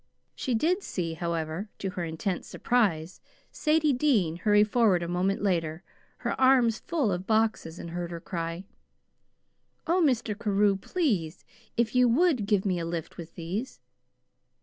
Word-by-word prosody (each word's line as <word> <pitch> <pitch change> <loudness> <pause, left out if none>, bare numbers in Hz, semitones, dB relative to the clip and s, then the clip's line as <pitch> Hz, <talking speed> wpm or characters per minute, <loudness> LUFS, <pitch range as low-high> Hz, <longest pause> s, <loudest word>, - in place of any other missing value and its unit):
She 255 - -2
did 345 - +1
see, 170 - -3
however, 165 +3 -3
to 195 - -3
her 180 - -4
intense 170 +3 -3
surprise, 190 -9 0 0.3
Sadie 305 -1 +2
Dean 230 - +2
hurry 210 +2 +4
forward 210 -5 +2
a - - -3
moment 185 +3 0
later, 170 -3 -1 0.4
her - - +1
arms 255 -4 +4
full 295 -11 -1
of 180 +1 -3
boxes, 220 -7 +1
and 170 - -7
heard 175 0 -4
her 170 -1 -6
cry: 165 0 -4 1.2
"Oh, 355 +3 +2
Mr. 250 -6 +1
Carew, 205 -1 +2
please, 195 - -2 0.3
if 235 -2 +1
you 250 -1 +4
WOULD 265 - +2
give 205 -2 +2
me 185 -3 0
a 165 - -3
lift 165 -2 -5
with 165 -1 -9
these!" 180 - -5
200 Hz, 150 wpm, -28 LUFS, 170-240 Hz, 1.2 s, hurry